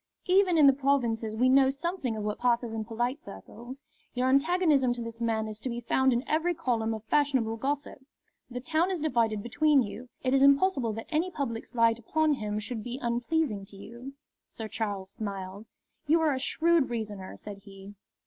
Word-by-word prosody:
"Even 365 -1 +4
in 300 - +6
the 275 - +7
provinces 240 -5 0
we 250 +3 +3
know 265 +1 +5
something 280 -3 -3
of 215 - -4
what 210 0 -3
passes 240 -1 +1
in 220 -1 -3
polite 240 +5 -2
circles. 240 +5 -11 0.3
Your 250 +1 +1
antagonism 285 -2 +3
to 245 - -6
this 230 0 -8
man 220 -1 0
is 215 0 -7
to 255 - -4
be 235 0 -4
found 265 +2 +2
in 245 +3 -1
every 335 +3 +1
column 230 -8 -1
of 220 - -9
fashionable 250 -3 +1
gossip. 275 +2 -3 0.5
The 250 0 -6
town 320 +6 +1
is 370 -3 -2
divided 230 -8 0
between 285 +3 +3
you. 235 +4 -8
It 260 0 +1
is 270 - +4
impossible 280 -3 +4
that 225 +1 -6
any 325 +4 +1
public 265 -9 -4
slight 230 -1 +2
upon 310 +6 +1
him 210 -5 -3
should 220 +2 -4
be 245 +2 -5
unpleasing 240 -1 -1
to 200 - -14
you." 235 +6 -10 0.3
Sir 220 - -7
Charles 200 -3 -4
smiled. 200 -1 -6 0.4
"You 325 +3 +4
are 310 -3 +2
a 260 - -2
shrewd 330 +1 +2
reasoner," 210 -5 -5
said 205 -1 -9
he. 195 0 -12
245 Hz, 190 wpm, -28 LUFS, 220-285 Hz, 0.5 s, the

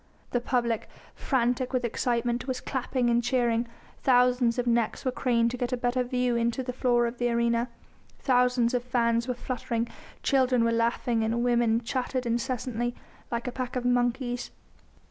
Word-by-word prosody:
The 245 - 0
public, 235 -3 -1 0.2
frantic 250 0 0
with 250 -1 +1
excitement, 240 +1 -1
was 255 -1 -2
clapping 255 -1 -1
and 235 0 +2
cheering; 240 -2 +1 0.3
thousands 250 -1 +3
of 245 - 0
necks 235 0 0
were 255 - +2
craned 235 -2 +1
to 250 - -4
get 245 +1 -2
a 250 - 0
better 245 +1 0
view 250 -1 0
into 235 +2 0
the 250 0 -4
floor 240 -1 +2
of 235 +1 -4
the 245 0 +1
arena, 235 0 +1 0.5
thousands 250 -2 +2
of 245 -1 0
fans 235 -1 +1
were 250 - -1
fluttering, 235 -2 -3 0.4
children 255 -3 +3
were 230 - +2
laughing 230 0 +1
and 230 +2 0
women 235 -2 +2
chattered 255 +1 -2
incessantly, 240 0 -2 0.3
like 235 0 -3
a 250 - -2
pack 250 0 -4
of 250 -1 -2
monkeys. 245 0 0
245 Hz, 165 wpm, -27 LUFS, 235-250 Hz, 0.5 s, thousands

